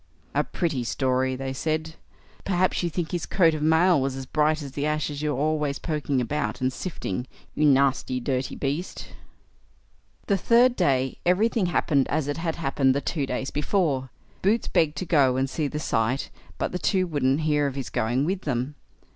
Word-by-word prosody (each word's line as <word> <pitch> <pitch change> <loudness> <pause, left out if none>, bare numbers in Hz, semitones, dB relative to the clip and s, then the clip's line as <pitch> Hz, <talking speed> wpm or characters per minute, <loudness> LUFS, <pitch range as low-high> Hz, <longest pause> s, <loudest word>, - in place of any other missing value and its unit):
"A - - +2
pretty 155 -8 -2
story", 130 +1 0
they 135 0 -4
said. 160 +3 -2 0.5
"Perhaps 185 -1 +1
you 175 - 0
think 165 0 -3
his 175 -2 -3
coat 165 -4 +4
of 155 - -3
mail 160 +1 +4
was 135 0 -1
as 135 0 -6
bright 155 +2 +1
as 140 - -7
the 140 +1 -4
ashes 150 -1 -2
you 150 -1 0
are 135 - -2
always 150 -1 0
poking 150 -4 -1
about, 140 +5 -2
and 130 0 0
sifting, 125 - -4 0.3
you 150 - +1
nasty 135 -2 +2
dirty 130 +1 -2
beast." 145 +6 -4 1.2
The 200 - +2
third 240 +6 +4
day 135 - +1
everything 200 +2 +2
happened 145 -5 +2
as 150 -1 -1
it 145 - -2
had 165 -1 -2
happened 135 -4 +1
the - - +2
two 145 -3 -2
days 130 +1 -3
before. 145 -5 0 0.3
Boots 210 +4 +2
begged 155 -2 +1
to 185 - -3
go 140 -7 +3
and 135 +1 +1
see 150 +2 -2
the 150 - -5
sight, 125 -1 -1 0.3
but - - -2
the 180 - -3
two 185 -1 +1
wouldn't 145 -3 +1
hear 150 -2 +2
of 135 - -4
his 135 -2 -5
going 120 +5 0
with 185 +3 -1
them. 130 -1 -2
150 Hz, 190 wpm, -25 LUFS, 135-165 Hz, 1.2 s, coat